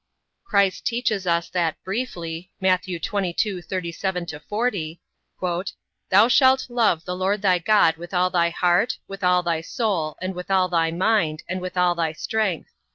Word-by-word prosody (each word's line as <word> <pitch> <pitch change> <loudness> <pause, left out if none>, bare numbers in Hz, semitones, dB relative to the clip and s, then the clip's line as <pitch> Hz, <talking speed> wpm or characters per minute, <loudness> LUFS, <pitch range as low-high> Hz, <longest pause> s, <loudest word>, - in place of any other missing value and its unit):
Christ 200 - +1
teaches 230 -5 -1
us 170 0 +1
that 170 -3 0
briefly, 180 -5 -4
Matt. 185 0 +2
22:37 180 -2 -3
40, 195 -5 -2 1.1
"Thou 205 +4 +6
shalt 260 +1 +4
love 225 -9 +2
the 180 - -3
Lord 195 +3 -1
thy 185 -3 +4
God 170 -3 +3
with 175 +1 -9
all 180 0 +2
thy 170 -2 +2
heart, 175 +5 +1
with 195 0 -8
all 180 0 +3
thy 170 -2 0
soul, 170 -5 -2
and 185 +1 -3
with 180 +1 -8
all 190 -1 +3
thy 165 -2 +2
mind, 170 -3 +1
and 185 +1 -3
with 185 0 -6
all 180 -1 +4
thy 165 -2 -1
strength. 195 0 -2
180 Hz, 155 wpm, -23 LUFS, 170-200 Hz, 1.1 s, Thou